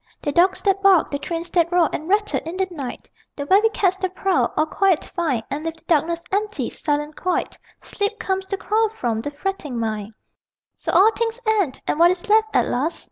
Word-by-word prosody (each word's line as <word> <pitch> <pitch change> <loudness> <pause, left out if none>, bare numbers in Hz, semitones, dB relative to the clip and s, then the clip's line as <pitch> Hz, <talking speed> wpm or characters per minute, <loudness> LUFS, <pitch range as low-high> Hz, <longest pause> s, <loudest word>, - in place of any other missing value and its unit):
The 290 - 0
dogs 360 +5 +3
that 390 -1 +2
bark, 390 -4 +4
The 285 - -2
trains 335 +2 -5
that 340 -1 +2
roar 350 -2 +4
and 315 +3 -4
rattle 415 +1 +1
in 330 +3 -6
the 380 -1 0
night, 275 -7 -7 0.3
The 285 - -5
very 405 +8 +4
cats 380 -4 +1
that 375 -1 -3
prowl, 385 -2 +1
all 310 - +3
quiet 370 +1 +1
find 295 -11 -2
And 290 +2 -3
leave 325 0 -3
the 325 - -22
darkness 335 +1 +1
empty, 400 - -1
silent 295 0 -2
quite: 365 -1 -2 0.3
Sleep 410 +1 -2
comes 380 -3 -2
to 390 - -2
chloroform 420 - 0
the 290 - -4
fretting 290 -4 -4
mind. 215 -1 -3 0.6
So - - -4
all 425 +4 +6
things 460 +1 -2
end: 410 -11 +1
and 300 - -1
what 340 +1 +7
is 365 +4 -2
left 435 +1 +4
at - - +4
last? 285 +7 -1
350 Hz, 205 wpm, -22 LUFS, 295-390 Hz, 0.6 s, what